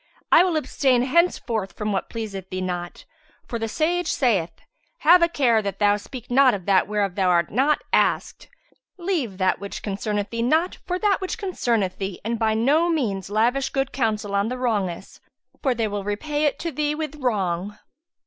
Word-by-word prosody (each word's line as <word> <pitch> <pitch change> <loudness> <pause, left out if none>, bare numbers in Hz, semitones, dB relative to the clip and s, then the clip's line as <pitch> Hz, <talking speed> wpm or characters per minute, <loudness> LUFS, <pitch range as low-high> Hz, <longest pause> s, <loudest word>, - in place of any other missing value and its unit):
I - - +8
will 355 -4 +1
abstain 265 -4 +1
henceforth 255 - +1
from 210 0 -3
what 195 - -2
pleaseth 200 -5 -6
thee 185 - -4
not; 175 -1 -5 0.4
for 235 - -4
the 225 - -2
sage 340 +9 0
saith, 205 - +1 0.5
'Have 345 +3 +7
a 340 - +5
care 245 -8 +2
that 200 -2 -4
thou 205 0 +3
speak 245 +4 -9
not 260 -2 +5
of 185 -3 -8
that 195 -2 +3
whereof 205 -3 -1
thou 185 -1 +1
art 170 -2 +2
not 275 +7 +2
asked; - - +1 0.5
leave 335 - -2
that 185 -1 +1
which 200 0 -7
concerneth 205 0 -2
thee 230 0 -2
not 315 +9 +1
for 360 0 -1
that 400 0 +1
which 375 - -3
concerneth 235 - -1
thee, 195 -2 -4
and 230 0 -2
by 220 -1 +2
no 290 +10 +3
means 210 - -1
lavish 240 +6 +1
good 270 0 -1
counsel 215 -5 -1
on 200 +2 +1
the 255 - -3
wrongous, 205 -8 -2 0.4
for 265 -4 +1
they 225 -1 0
will 205 -1 -4
repay 290 +9 -2
it 290 - +1
to 335 - -4
thee 295 +1 -1
with 305 -1 -5
wrong.'" 205 - -1
230 Hz, 185 wpm, -23 LUFS, 200-290 Hz, 0.5 s, I